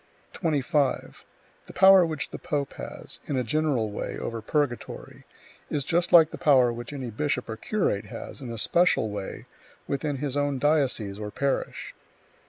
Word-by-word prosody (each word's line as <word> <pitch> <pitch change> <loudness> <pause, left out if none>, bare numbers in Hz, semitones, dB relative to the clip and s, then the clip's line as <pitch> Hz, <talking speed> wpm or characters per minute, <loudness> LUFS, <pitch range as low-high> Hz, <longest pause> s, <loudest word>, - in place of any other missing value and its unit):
25. 145 -4 0 0.4
The - - -11
power 190 -1 +8
which 155 -3 -3
the - - -7
pope 140 -2 -2
has, - - -7
in 140 - -1
a 125 - +1
general 130 -4 0
way, - - -4
over 115 -1 -4
purgatory, 140 0 -3 0.4
is 145 - -1
just 170 +4 +1
like 165 -2 +7
the - - -8
power 130 -5 +5
which 120 +2 -7
any 130 -5 -5
bishop 125 +2 -1
or 110 - -4
curate 115 - -1
has, - - -8
in 125 -3 -6
a 115 - -5
special 145 -3 +2
way, 100 -2 -6 0.4
within 145 +1 -2
his 140 0 -3
own 145 -1 0
diocese 130 -8 +1
or 105 -1 -4
parish. 140 +5 -2
140 Hz, 165 wpm, -26 LUFS, 120-150 Hz, 0.4 s, power